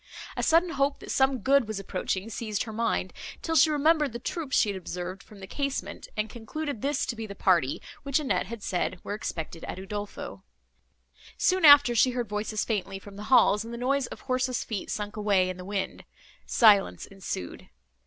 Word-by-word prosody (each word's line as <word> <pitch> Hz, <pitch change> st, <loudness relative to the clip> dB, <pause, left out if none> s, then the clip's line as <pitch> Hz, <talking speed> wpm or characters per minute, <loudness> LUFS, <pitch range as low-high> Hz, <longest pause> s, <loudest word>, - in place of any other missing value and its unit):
A -, -, -2 dB
sudden 335 Hz, +1 st, +3 dB
hope, 275 Hz, 0 st, +1 dB
that -, -, -8 dB
some 265 Hz, -2 st, +2 dB
good 275 Hz, 0 st, +3 dB
was 215 Hz, -2 st, -3 dB
approaching, 190 Hz, +1 st, -3 dB
seized 215 Hz, -1 st, -2 dB
her 220 Hz, -, -8 dB
mind, 230 Hz, +1 st, -1 dB, 0.3 s
till 325 Hz, -, -1 dB
she 320 Hz, -, +6 dB
remembered 300 Hz, -2 st, +2 dB
the -, -, -3 dB
troops 300 Hz, +2 st, -2 dB
she 215 Hz, -, +4 dB
had 200 Hz, -, -2 dB
observed 180 Hz, +1 st, -5 dB
from 210 Hz, -, -15 dB
the -, -, -6 dB
casement, 265 Hz, -5 st, -4 dB
and 215 Hz, 0 st, 0 dB
concluded 240 Hz, +3 st, -5 dB
this 280 Hz, 0 st, 0 dB
to 240 Hz, -, -3 dB
be 225 Hz, -1 st, -6 dB
the 200 Hz, -, -8 dB
party, 170 Hz, -9 st, +2 dB, 0.2 s
which 275 Hz, +1 st, +1 dB
Annette 195 Hz, -12 st, 0 dB
had 225 Hz, -1 st, -7 dB
said 180 Hz, 0 st, -1 dB
were -, -, -4 dB
expected 165 Hz, -5 st, -5 dB
at -, -, -6 dB
Udolpho. 205 Hz, +2 st, -6 dB, 1.0 s
Soon 370 Hz, -2 st, +3 dB
after, 285 Hz, -4 st, +9 dB
she 240 Hz, +2 st, +4 dB
heard 240 Hz, -2 st, -1 dB
voices 210 Hz, +1 st, -2 dB
faintly 195 Hz, -3 st, -2 dB
from 195 Hz, +1 st, -12 dB
the 205 Hz, +1 st, -7 dB
halls, 220 Hz, -4 st, +5 dB
and 230 Hz, -, -8 dB
the 235 Hz, -, -5 dB
noise 265 Hz, +2 st, 0 dB
of -, -, -10 dB
horses' 255 Hz, -1 st, -1 dB
feet 215 Hz, -4 st, -5 dB
sunk 210 Hz, 0 st, -4 dB
away 200 Hz, -3 st, +2 dB
in 185 Hz, -, -9 dB
the 180 Hz, -, -8 dB
wind; 200 Hz, -1 st, -3 dB, 0.4 s
silence 210 Hz, -4 st, +4 dB
ensued. 190 Hz, -, -6 dB
220 Hz, 195 wpm, -27 LUFS, 195-270 Hz, 1.0 s, after